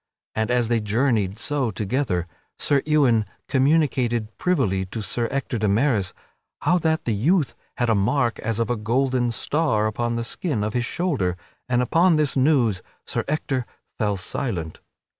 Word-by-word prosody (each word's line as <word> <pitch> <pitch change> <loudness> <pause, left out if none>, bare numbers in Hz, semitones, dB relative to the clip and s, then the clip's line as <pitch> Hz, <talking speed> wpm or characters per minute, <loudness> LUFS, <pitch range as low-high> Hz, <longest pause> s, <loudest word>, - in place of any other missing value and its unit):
And, 110 +1 -1
as 120 -1 +2
they 115 0 +2
journeyed 105 -2 +1
so 140 +1 -1
together, 105 -3 -1 0.3
Sir 140 -2 +2
Ewain 135 -8 +4 0.2
communicated 130 -6 +1
privily 120 - +1
to 105 +4 -5
Sir 115 +3 -1
Ector 130 -3 -2
de 105 - +1
Maris 105 -3 +2 0.5
how 180 +1 +3
that 160 -1 0
the 115 - +1
youth 150 - +2 0.2
had 120 - +1
a 115 - +3
mark 115 +4 +1
as 115 -1 -2
of 115 0 0
a - - +1
golden 120 +3 +1
star 115 -2 0
upon 120 +2 -1
the 115 - -1
skin 120 - -1
of 105 0 -2
his 120 0 0
shoulder, 115 - -1 0.3
and 125 0 +2
upon 165 +6 +4
this 150 -2 +1
news 130 -8 +3 0.2
Sir - - -1
Ector 140 -3 -1 0.4
fell 105 -3 +1
very - - -5
silent. 85 -11 -3
120 Hz, 165 wpm, -23 LUFS, 110-140 Hz, 0.5 s, Ewain